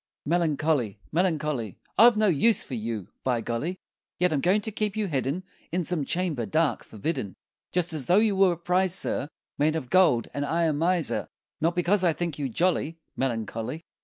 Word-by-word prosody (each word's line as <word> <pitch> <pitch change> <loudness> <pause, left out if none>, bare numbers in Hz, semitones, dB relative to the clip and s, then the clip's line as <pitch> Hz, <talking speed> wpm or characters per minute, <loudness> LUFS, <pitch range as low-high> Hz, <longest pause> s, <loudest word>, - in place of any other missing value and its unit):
Melancholy, 155 - +1
Melancholy, 150 - -1 0.2
I've 235 0 +7
no 215 - +3
use 205 +5 +4
for - - -9
you, 110 -4 -4
by 125 -2 +1
Golly! 130 +12 -3 0.4
Yet 180 -2 +2
I'm 140 - 0
going 190 +6 +3
to 220 - -2
keep 210 0 -2
you 215 - +1
hidden 145 +1 -2 0.3
In 180 +2 0
some 165 -4 -1
chamber 165 -10 -1
dark, 155 -6 +1
forbidden, 110 - -4 0.4
Just 175 -1 +1
as 145 -5 -4
though 180 - +5
you 215 -2 +3
were 190 -2 +4
a - - -7
prize, 180 +2 +2
sir, 145 - -1 0.3
Made 155 +2 +2
of 130 -6 -4
gold, 160 -11 +4
and 145 - -2
I 165 +4 0
a 160 -2 +2
miser 165 +2 0 0.3
Not 165 +2 +1
because 180 +2 +2
I 170 -3 +4
think 170 -2 -3
you 140 -2 -1
jolly, 165 +3 0 0.2
Melancholy! 115 +3 -3
160 Hz, 185 wpm, -26 LUFS, 135-180 Hz, 0.4 s, I've